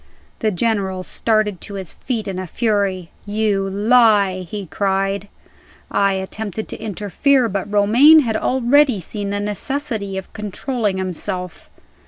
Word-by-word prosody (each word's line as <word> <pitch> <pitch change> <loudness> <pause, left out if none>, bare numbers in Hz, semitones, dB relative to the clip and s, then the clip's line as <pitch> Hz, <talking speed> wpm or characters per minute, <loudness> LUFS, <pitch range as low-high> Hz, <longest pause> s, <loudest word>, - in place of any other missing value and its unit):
The 220 - +1
General 195 -2 -1
started 215 -3 0
to 200 - -6
his 190 -3 -6
feet 230 -5 -4
in 190 -2 -3
a 185 - -5
fury. 200 -4 -1 0.2
"You 205 -2 0
lie!" 205 -2 +4
he 205 -2 -5
cried. 195 +2 -1 0.6
I 200 -1 +2
attempted 205 +2 -5
to - - -7
interfere, 220 - +1
but 200 -1 -4
Romayne 240 +10 +6
had 230 -5 -1
already 260 0 +3
seen 200 +3 -5
the 205 0 -2
necessity 210 -1 -3
of 190 - -7
controlling 210 0 -2
himself. 185 -1 -4
205 Hz, 135 wpm, -19 LUFS, 195-225 Hz, 0.6 s, Romayne